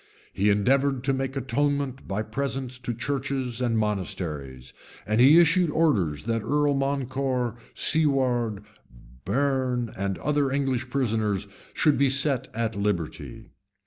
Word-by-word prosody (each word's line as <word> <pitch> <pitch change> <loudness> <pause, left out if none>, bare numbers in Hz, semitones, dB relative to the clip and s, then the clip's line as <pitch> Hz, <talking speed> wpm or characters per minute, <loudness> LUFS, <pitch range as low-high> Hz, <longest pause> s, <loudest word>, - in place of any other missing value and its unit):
He 100 +2 +2
endeavored 130 +6 +2
to 135 0 +1
make 135 0 -3
atonement 140 +1 -1
by 105 +2 -2
presents 130 +2 -4
to 120 - -4
churches 130 0 -3
and 120 -2 +1
monasteries; 80 - -3 0.3
and 110 +2 +2
he 145 +6 +8
issued 175 +1 +4
orders 105 - +1
that 115 0 -1
Earl 145 +4 +1
Morcar, 135 -3 -1 0.2
Siward, 125 -8 +2 0.6
Bearne, 130 0 0
and 95 0 -2
other 145 -1 0
English 135 -2 -1
prisoners, 110 -7 0 0.3
should 150 -3 +3
be 140 -1 +4
set 135 -1 +1
at 115 -1 -1
liberty. 100 -6 -3
130 Hz, 125 wpm, -26 LUFS, 110-140 Hz, 0.6 s, he